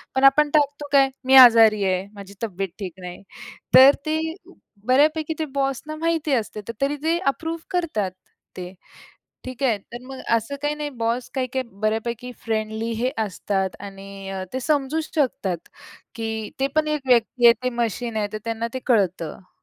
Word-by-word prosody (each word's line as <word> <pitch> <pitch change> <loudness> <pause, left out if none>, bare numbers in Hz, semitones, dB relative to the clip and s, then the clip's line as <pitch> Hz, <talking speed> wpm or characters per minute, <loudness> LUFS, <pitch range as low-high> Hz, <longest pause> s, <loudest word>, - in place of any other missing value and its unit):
पण 265 - +1
आपण 300 +2 +2
टाकतो 290 -1 +1
काय? 275 -1 +5 0.2
मी 265 +1 +5
आजारी 225 -5 +8
आहे, 185 0 0
माझी 200 -1 -11
तब्येत 195 -2 -3
ठीक 185 -4 -5
नाही. 180 +1 -8 0.5
तर 270 +2 +9
ते 310 0 0 0.7
बऱ्यापैकी 305 +4 +3
ते 315 - 0
बॉस 270 -2 0
ना 310 - -5
माहिती 320 -2 -1
असते, 215 -3 -2 0.2
तरी 280 +2 +1
ते 330 +1 +2 0.2
अप्रूव्ह 325 +2 -5
करतात 305 - -1 0.5
ते, 180 0 -7 0.7
ठीक 255 +1 -7
आहे. 230 -6 +2
तर 240 +5 -11
मग 265 -1 -8 0.2
असं 230 +5 -4
काही 295 0 0
नाही, 300 -1 -4
बॉस 235 +2 -1
काही-काही 260 0 -2 0.2
बऱ्यापैकी 235 +3 -2
फ्रेंडली 220 0 -2
हे 255 +2 +1 0.2
असतात 190 0 -2
आणि 195 -1 -7
ते 260 - -2
समजूच 305 +3 -1
शकतात, 205 - 0 0.6
की 220 -1 -4
ते 270 - +3
पण 310 0 +2
एक 300 -1 -1
व्यक्ती 240 0 +3
आहे. 235 - +8
ते 255 - +1
मशीन 235 -1 -2
आहे, 210 -1 0
तर 215 - -3
त्यांना 230 0 -2
ते - - -1
कळतं. 185 - 0
240 Hz, 165 wpm, -23 LUFS, 210-280 Hz, 0.7 s, तर